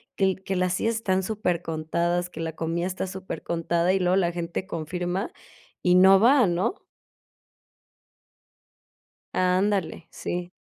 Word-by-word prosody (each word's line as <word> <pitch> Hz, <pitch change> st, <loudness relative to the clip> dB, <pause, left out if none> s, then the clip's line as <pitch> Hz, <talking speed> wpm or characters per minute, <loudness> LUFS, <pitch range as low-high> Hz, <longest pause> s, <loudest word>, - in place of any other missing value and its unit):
que 190 Hz, -1 st, +2 dB
que 190 Hz, 0 st, -4 dB
las 180 Hz, 0 st, +1 dB
sillas 225 Hz, +4 st, 0 dB
están 190 Hz, -4 st, 0 dB
supercontadas, 175 Hz, -3 st, -1 dB
que 170 Hz, -, -10 dB
la 160 Hz, -1 st, -4 dB
comida 165 Hz, +2 st, -2 dB
está 185 Hz, +1 st, -3 dB
supercontada, 175 Hz, -2 st, -1 dB
y 190 Hz, -, +2 dB
luego 180 Hz, 0 st, +2 dB
la 175 Hz, -3 st, +2 dB
gente 170 Hz, +2 st, -4 dB
confirma 175 Hz, +5 st, -3 dB, 0.5 s
y 180 Hz, -1 st, +4 dB
no 190 Hz, +1 st, +7 dB
va, 250 Hz, +3 st, +5 dB
¿no? 180 Hz, -, -1 dB, 2.5 s
Ándale, 185 Hz, -2 st, +1 dB
sí. 175 Hz, 0 st, -5 dB
180 Hz, 125 wpm, -25 LUFS, 170-190 Hz, 2.5 s, no